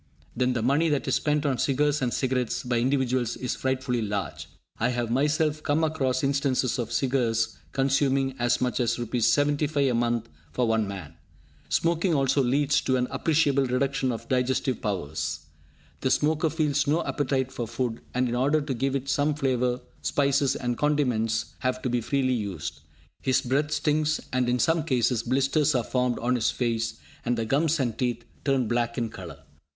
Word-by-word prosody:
Then 125 Hz, +1 st, +1 dB
the 120 Hz, -3 st, -1 dB
money 145 Hz, +7 st, +3 dB
that 145 Hz, -2 st, 0 dB
is -, -, +1 dB
spent 150 Hz, 0 st, +1 dB
on 135 Hz, -4 st, 0 dB
cigars 145 Hz, +1 st, +1 dB
and 125 Hz, -2 st, 0 dB
cigarettes 125 Hz, -2 st, -1 dB
by 120 Hz, -1 st, 0 dB
individuals 130 Hz, -2 st, 0 dB
is 125 Hz, -, -2 dB
frightfully 130 Hz, -2 st, -1 dB
large. 100 Hz, -2 st, -3 dB, 0.3 s
I 120 Hz, -, +2 dB
have 120 Hz, -2 st, -2 dB
myself 150 Hz, +3 st, +1 dB
come 155 Hz, +2 st, +1 dB
across 140 Hz, -5 st, 0 dB
instances 135 Hz, -2 st, +1 dB
of 120 Hz, -1 st, -3 dB
cigars 120 Hz, -3 st, +1 dB, 0.2 s
consuming 135 Hz, 0 st, +1 dB
as 120 Hz, 0 st, +2 dB
much 125 Hz, 0 st, 0 dB
as 120 Hz, -2 st, +1 dB
Rs. 120 Hz, -1 st, 0 dB
75 145 Hz, +1 st, +2 dB
a -, -, 0 dB
month 120 Hz, -1 st, 0 dB, 0.3 s
for 120 Hz, +7 st, +1 dB
one 110 Hz, -2 st, +1 dB
man! 90 Hz, -6 st, -7 dB, 0.6 s
Smoking 170 Hz, +1 st, +1 dB
also 135 Hz, 0 st, +2 dB
leads 140 Hz, +3 st, +2 dB
to 130 Hz, -, +1 dB
an 125 Hz, 0 st, -1 dB
appreciable 145 Hz, -4 st, +2 dB
reduction 130 Hz, +1 st, 0 dB
of 115 Hz, -, -6 dB
digestive 130 Hz, 0 st, 0 dB
powers. 90 Hz, -, -3 dB, 0.6 s
The -, -, 0 dB
smoker 155 Hz, +2 st, +2 dB
feels 150 Hz, -3 st, 0 dB
no 155 Hz, +4 st, +1 dB
appetite 130 Hz, -2 st, -1 dB
for 120 Hz, -, -4 dB
food, 120 Hz, -1 st, -3 dB
and 125 Hz, 0 st, +2 dB
in 120 Hz, -, -2 dB
order 140 Hz, +5 st, +2 dB
to 145 Hz, -2 st, -3 dB
give 135 Hz, +3 st, -1 dB
it 135 Hz, 0 st, -3 dB
some 145 Hz, +2 st, +1 dB
flavour, 125 Hz, -3 st, 0 dB, 0.2 s
spices 140 Hz, -1 st, +2 dB
and 120 Hz, -2 st, -2 dB
condiments 125 Hz, -7 st, 0 dB
have 130 Hz, 0 st, -1 dB
to 125 Hz, -, -1 dB
be 120 Hz, -1 st, +1 dB
freely 130 Hz, +2 st, +1 dB
used. 90 Hz, -10 st, -4 dB, 0.4 s
His 130 Hz, -1 st, +2 dB
breath 140 Hz, +4 st, 0 dB
stinks, 155 Hz, +1 st, +1 dB
and, 125 Hz, -1 st, +1 dB
in 125 Hz, -, +2 dB
some 165 Hz, +4 st, +2 dB
cases, 125 Hz, -5 st, +1 dB
blisters 135 Hz, +4 st, +1 dB
are 125 Hz, -, +2 dB
formed 125 Hz, 0 st, 0 dB
on 125 Hz, +2 st, 0 dB
his 120 Hz, -3 st, +2 dB
face, 115 Hz, -2 st, -1 dB, 0.3 s
and 120 Hz, 0 st, 0 dB
the 115 Hz, -, -1 dB
gums 150 Hz, +6 st, +1 dB
and 120 Hz, -4 st, 0 dB
teeth 120 Hz, -2 st, -2 dB, 0.2 s
turn 135 Hz, -4 st, +1 dB
black 120 Hz, 0 st, -1 dB
in 115 Hz, -2 st, -1 dB
colour. 80 Hz, -9 st, -10 dB
130 Hz, 180 wpm, -26 LUFS, 120-145 Hz, 0.6 s, money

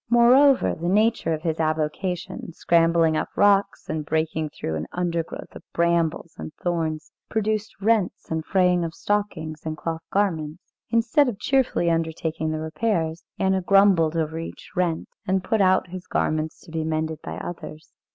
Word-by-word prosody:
Moreover, 250 Hz, +4 st, +5 dB
the 170 Hz, +2 st, -3 dB
nature 215 Hz, -3 st, +2 dB
of 155 Hz, 0 st, -2 dB
his 160 Hz, -2 st, -1 dB
avocation, 160 Hz, +3 st, -2 dB
scrambling 165 Hz, -1 st, +3 dB
up -, -, -1 dB
rocks 200 Hz, -1 st, +3 dB
and 155 Hz, -1 st, -2 dB
breaking 160 Hz, 0 st, -1 dB
through 80 Hz, -, -5 dB
an 80 Hz, +1 st, -3 dB
undergrowth 170 Hz, -2 st, -3 dB
of -, -, -9 dB
brambles 170 Hz, -1 st, +1 dB
and -, -, -6 dB
thorns, 160 Hz, -3 st, -2 dB, 0.2 s
produced 215 Hz, -1 st, -1 dB
rents 210 Hz, -4 st, 0 dB
and 160 Hz, 0 st, -1 dB
fraying 180 Hz, -1 st, +2 dB
of 165 Hz, -1 st, -4 dB
stockings 175 Hz, -7 st, -2 dB
and 155 Hz, -1 st, -4 dB
cloth 165 Hz, +1 st, -4 dB
garments. 170 Hz, -4 st, -1 dB, 0.2 s
Instead 235 Hz, +5 st, +3 dB
of 215 Hz, -, -5 dB
cheerfully 245 Hz, -8 st, +1 dB
undertaking 160 Hz, -1 st, -1 dB
the 155 Hz, 0 st, -2 dB
repairs, 160 Hz, 0 st, -1 dB
Anna 190 Hz, 0 st, +1 dB
grumbled 185 Hz, -4 st, +4 dB
over 160 Hz, 0 st, -1 dB
each 165 Hz, -, -8 dB
rent, 175 Hz, -3 st, 0 dB, 0.2 s
and 190 Hz, 0 st, +1 dB
put 220 Hz, +1 st, +1 dB
out 185 Hz, -1 st, +3 dB
his 185 Hz, -1 st, -7 dB
garments 155 Hz, 0 st, -1 dB
to -, -, -14 dB
be 160 Hz, -1 st, -2 dB
mended 160 Hz, -1 st, -2 dB
by 80 Hz, 0 st, -6 dB
others. 155 Hz, -3 st, -8 dB
170 Hz, 160 wpm, -24 LUFS, 160-195 Hz, 0.2 s, Moreover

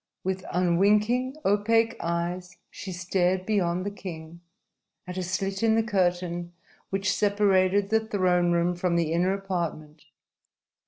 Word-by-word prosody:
With 190 Hz, 0 st, -2 dB
unwinking, 210 Hz, -, +2 dB
opaque 225 Hz, +3 st, +2 dB
eyes, 175 Hz, +1 st, -3 dB
she 190 Hz, -, -7 dB
stared 185 Hz, +1 st, 0 dB
beyond 185 Hz, -4 st, 0 dB
the 205 Hz, -, -2 dB
king, 170 Hz, -4 st, -9 dB, 0.6 s
at 180 Hz, -1 st, -7 dB
a 185 Hz, -, -2 dB
slit 195 Hz, +2 st, -2 dB
in 225 Hz, -1 st, +3 dB
the 225 Hz, -, +2 dB
curtain 175 Hz, -4 st, -1 dB, 0.4 s
which 195 Hz, +1 st, 0 dB
separated 200 Hz, -1 st, +2 dB
the 220 Hz, -, +4 dB
throne 180 Hz, -4 st, +2 dB
room 170 Hz, +1 st, +2 dB
from 175 Hz, 0 st, -1 dB
the 165 Hz, -2 st, +1 dB
inner 180 Hz, +3 st, +2 dB
apartment. 170 Hz, -6 st, -4 dB
185 Hz, 130 wpm, -26 LUFS, 175-200 Hz, 0.6 s, the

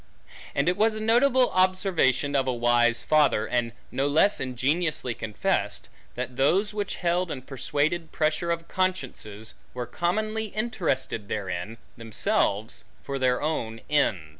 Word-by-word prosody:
And 140 Hz, -, +1 dB
it 180 Hz, -, +2 dB
was 220 Hz, +1 st, +3 dB
a -, -, -4 dB
notable 245 Hz, +3 st, +3 dB
observation 185 Hz, -7 st, +2 dB
of 135 Hz, -1 st, +2 dB
a -, -, +2 dB
wise 120 Hz, 0 st, +3 dB
father, 150 Hz, -8 st, +3 dB
and 120 Hz, 0 st, -1 dB, 0.2 s
no 135 Hz, +1 st, 0 dB
less 160 Hz, +8 st, +3 dB
ingenuously 130 Hz, +2 st, -1 dB
confessed; 110 Hz, -2 st, -2 dB, 0.3 s
that 125 Hz, 0 st, -5 dB
those 190 Hz, +10 st, +2 dB
which 205 Hz, -2 st, -3 dB
held 175 Hz, 0 st, 0 dB
and 130 Hz, -4 st, -6 dB
persuaded 150 Hz, +5 st, -1 dB
pressure 155 Hz, +2 st, 0 dB
of 170 Hz, 0 st, -2 dB
consciences, 130 Hz, -, -2 dB, 0.2 s
were 125 Hz, -1 st, -3 dB
commonly 215 Hz, -, -1 dB
interested 185 Hz, -, -2 dB
therein, 100 Hz, +1 st, -4 dB, 0.2 s
themselves, 110 Hz, -2 st, 0 dB, 0.2 s
for 140 Hz, -1 st, -4 dB
their 130 Hz, +1 st, +1 dB
own 115 Hz, -8 st, -2 dB
e 150 Hz, -1 st, +4 dB
145 Hz, 140 wpm, -26 LUFS, 120-185 Hz, 0.3 s, e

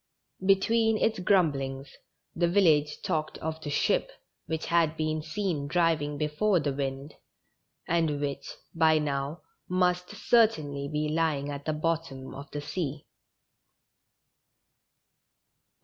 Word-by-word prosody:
Between 220 Hz, +3 st, +3 dB
its 220 Hz, -1 st, +1 dB
grumblings, 140 Hz, -8 st, +1 dB, 0.4 s
the 170 Hz, 0 st, +2 dB
village 155 Hz, -5 st, +3 dB
talked 155 Hz, 0 st, -2 dB
of 160 Hz, 0 st, -5 dB
the 150 Hz, -, -5 dB
ship 145 Hz, -, +1 dB, 0.4 s
which 160 Hz, -1 st, -3 dB
had 165 Hz, -2 st, +2 dB
been 155 Hz, 0 st, -1 dB
seen 160 Hz, -3 st, -2 dB
driving 160 Hz, -3 st, +1 dB
before 155 Hz, +6 st, +1 dB
the 145 Hz, -2 st, -1 dB
wind, 135 Hz, +1 st, -4 dB, 0.7 s
and 165 Hz, -4 st, +1 dB
which, 145 Hz, -1 st, -3 dB, 0.2 s
by 160 Hz, -1 st, +4 dB
now, 145 Hz, +1 st, -2 dB, 0.3 s
must 180 Hz, 0 st, +1 dB
certainly 195 Hz, -10 st, +2 dB
be 150 Hz, 0 st, 0 dB
lying 150 Hz, -2 st, 0 dB
at 140 Hz, 0 st, -7 dB
the 155 Hz, -, 0 dB
bottom 155 Hz, -3 st, -2 dB
cf 140 Hz, +1 st, -9 dB
tlie 145 Hz, 0 st, -5 dB
sea. 150 Hz, -4 st, -4 dB
155 Hz, 115 wpm, -28 LUFS, 145-175 Hz, 0.7 s, by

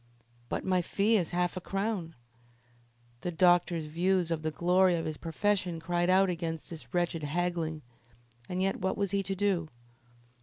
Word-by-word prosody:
"But -, -, -3 dB
my 185 Hz, -1 st, +2 dB
fee 205 Hz, +5 st, +2 dB
is 180 Hz, -6 st, +1 dB
half 175 Hz, 0 st, 0 dB
a 185 Hz, -, -4 dB
crown." 195 Hz, -4 st, -2 dB, 1.0 s
The 175 Hz, -, -3 dB
doctor's 175 Hz, -1 st, +3 dB
views 175 Hz, +2 st, +1 dB
of 160 Hz, -2 st, -1 dB
the 155 Hz, -, -1 dB
glory 180 Hz, +3 st, +3 dB
of 165 Hz, -, -2 dB
his 155 Hz, -1 st, -3 dB
profession 180 Hz, +1 st, -1 dB
cried 175 Hz, +2 st, 0 dB
out 190 Hz, +1 st, +5 dB
against 165 Hz, -3 st, -4 dB
this 160 Hz, -2 st, -8 dB
wretched 175 Hz, -2 st, 0 dB
haggling, 160 Hz, 0 st, -2 dB, 0.7 s
and 185 Hz, +1 st, -1 dB
yet 195 Hz, -, +1 dB
what 190 Hz, +1 st, -1 dB
was 200 Hz, -3 st, -1 dB
he 200 Hz, -, +1 dB
to 195 Hz, 0 st, -3 dB
do? 190 Hz, -4 st, +1 dB
175 Hz, 165 wpm, -30 LUFS, 165-190 Hz, 1.0 s, out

